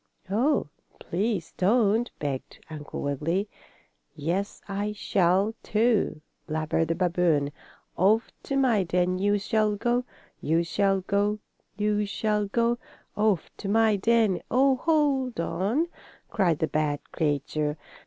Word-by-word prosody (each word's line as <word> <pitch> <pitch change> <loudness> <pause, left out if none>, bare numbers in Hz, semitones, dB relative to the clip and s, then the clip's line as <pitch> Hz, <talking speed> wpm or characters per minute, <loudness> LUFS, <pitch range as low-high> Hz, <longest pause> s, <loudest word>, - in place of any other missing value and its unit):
"Oh, 260 +9 +2 0.3
please 195 -1 -2
don't!" 225 +3 +3
begged 140 -3 -4
Uncle 150 -2 -6
Wiggily. 160 +8 -1 0.7
"Yes, 175 +7 -2
I 205 +1 -2
shall, 195 +1 +2
too!" 215 -7 +1 0.3
blabbered 155 +1 0
the 165 - 0
babboon. 170 -5 +1 0.4
"Off 210 +5 +3
to 275 - -1
my 245 -6 +3
den 180 0 0
you 205 +1 +2
shall 210 +1 +1
go 240 +4 0 0.4
you 165 +2 +1
shall 195 +2 +1
go 200 +2 0 0.4
you 210 0 +1
shall 210 0 0
go. 235 +3 +1 0.4
Off 210 -5 +1
to 195 - -5
my 220 0 +4
den. 220 -1 +2
Oh, 265 +2 +4
hold 275 - +1
on!" 205 - 0 0.5
cried 175 -7 +2
the 160 - 0
bad 150 -1 -2
creature. 150 0 -1
200 Hz, 125 wpm, -26 LUFS, 170-220 Hz, 0.7 s, my